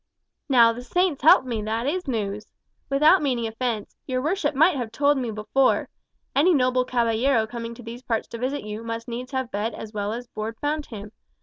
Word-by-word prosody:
"Now, 235 -3 +6
the 245 - -7
Saints 355 +3 0
help 275 -2 +7
me, 235 -4 -2
that 220 +3 -2
is 360 +4 -2
news! 210 -4 -3 0.4
Without 300 +7 +5
meaning 250 -5 0
offence, 225 -1 -3
your 255 -2 -1
worship 310 0 0
might 320 +4 +5
have 240 -4 -3
told 285 +4 +3
me 245 -3 -2
before. 220 +5 +1 0.5
Any 325 +5 +5
noble 255 -1 +2
caballero 235 0 +2
coming 230 +1 -6
to 245 - -12
these 230 +2 -8
parts 235 -3 -2
to 230 - -7
visit 265 +4 -2
you 210 +1 -6
must 230 0 -5
needs 245 +2 -6
have 260 -3 -2
bed 210 +3 -2
as 220 0 -8
well 205 0 -2
as 240 +2 -5
board 225 -1 -6
found 300 0 -2
him. 210 -3 -9
245 Hz, 200 wpm, -24 LUFS, 225-275 Hz, 0.5 s, help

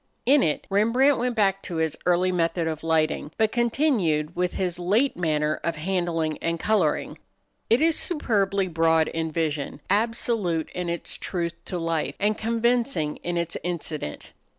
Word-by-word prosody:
In 275 +2 +5
it 150 - 0
Rembrandt 240 +7 +3
went 245 0 -1
back 195 -2 +2
to 175 - -5
his 160 -1 0
early 180 +1 +3
method 170 -1 0
of 160 -1 -4
lighting, 160 -2 +1
but 220 -1 +2
continued 225 - +1
with 180 0 -1
his 180 -2 -2
late 215 +10 +2
manner 155 -3 0
of 170 -1 -1
handling 165 -2 -1
and 165 0 -2
coloring. 190 -8 0 0.5
It 235 +5 +4
is 325 0 +3
superbly 200 - 0
broad 165 -1 +2
in 160 -1 -3
vision, 155 -3 -2
absolute 210 -6 0
in 180 -1 -3
its 170 0 -4
truth 170 -2 -3
to 180 - -4
life, 165 -2 -1
and 210 +1 +2
convincing 230 - 0
in 175 0 -3
its 170 -1 -2
incident. 160 - -5
175 Hz, 155 wpm, -25 LUFS, 160-220 Hz, 0.5 s, In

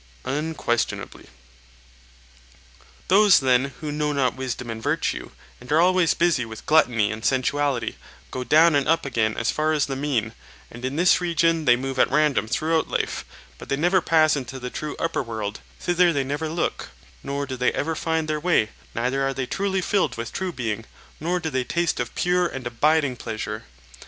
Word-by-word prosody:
Unquestionably. 145 -5 -2 1.8
Those 200 +1 +6
then 130 -1 +3 0.2
who 150 -1 -3
know 150 0 -1
not 135 -3 +1
wisdom 125 -2 -4
and 110 0 -6
virtue, - - -1 0.3
and 125 +3 -11
are 155 - +4
always 180 -1 +4
busy 170 -7 +2
with 110 -1 -9
gluttony 120 -9 +3
and 110 +1 -6
sensuality, 130 -2 0 0.4
go 130 - -3
down 155 +6 +5
and 140 -1 +2
up 165 -2 +2
again 110 -5 0
as 120 - +1
far 155 +1 0
as 150 -3 +2
the 135 - -4
mean; 130 -6 -1 0.4
and 120 +1 -11
in 130 +2 -2
this 180 +3 +4
region 165 -2 +1
they 120 - +6
move 130 +1 -4
at - - +4
random 145 -4 +2
throughout 160 +7 0
life, - - -2 0.3
but - - -11
they 135 - 0
never 175 +4 +3
pass 155 -1 +4
into 130 -1 -5
the 125 -1 -6
true 150 -1 -5
upper 165 - -1
world; 110 -4 -5 0.2
thither 175 0 +3
they 140 -4 0
neither 145 +4 -3
look, 170 +2 -2 0.3
nor 140 - -3
do 130 -1 -5
they 125 0 +1
ever 160 +2 -1
find 160 -1 -1
their 155 -1 -1
way, 155 -10 +2 0.3
neither 125 +4 0
are 135 0 -1
they 130 - -2
truly 195 +6 -1
filled 180 -10 0
with 115 0 -5
true 190 -1 -2
being, 115 -7 -3 0.4
nor 175 +3 -1
do 160 -2 -4
they 130 -1 0
taste 170 +5 -1
of 120 -1 -4
pure 180 0 +2
and 135 -6 -7
abiding 145 +3 +2
pleasure. 110 -2 -5
140 Hz, 185 wpm, -24 LUFS, 125-160 Hz, 1.8 s, Those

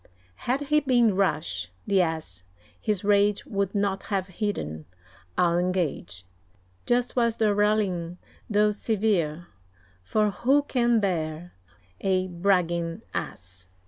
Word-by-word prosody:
Had 265 +3 +2
he 300 +1 +3
been 240 -7 +3
rash, 150 - -1 0.2
the 195 -2 +3
Ass, 160 - -3 0.4
his 210 -2 -1
rage 205 0 +3
Would 200 -1 -2
not 200 -1 0
have 195 -2 -1
hidden, 80 - -3 0.5
I'll 175 -1 +3
engage. 165 - -2 0.6
Just 245 0 +1
was 235 -2 +2
the 215 -2 +3
rallying, 200 -5 +1 0.3
though 210 0 +3
severe; 200 -7 0 0.6
For 210 - +1
who 270 +8 +2
can 240 -4 +2
bear 170 -3 -2 0.5
a 185 -1 +1
bragging 175 0 0
Ass? 90 0 -6
195 Hz, 115 wpm, -26 LUFS, 170-215 Hz, 0.6 s, he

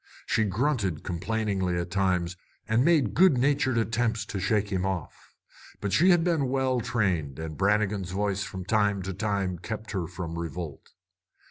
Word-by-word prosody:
She 110 -1 +2
grunted 105 - 0
complainingly 95 0 -1
at 85 0 -4
times, 90 -2 +1 0.3
and 110 +2 +3
made 145 - +3
good 175 -2 +5
natured 130 -1 +2
attempts 115 -1 0
to 105 -2 -4
shake 100 +2 +1
him 95 -1 0
off. 95 -5 -5 0.4
But 100 -2 -2
she 175 +4 +5
had 175 -2 +5
been 160 -7 +1
well 130 -1 +1
trained, 95 - -1
and 80 -1 -5
Brannigan's 100 -1 +1
voice 100 +1 -1
from 95 -1 -6
time 105 -1 +1
to 95 +1 -4
time 95 -2 -1
kept 110 +3 -6
her 90 -5 -2
from 85 -1 -5
revolt. 85 -3 -6
100 Hz, 160 wpm, -27 LUFS, 90-115 Hz, 0.4 s, good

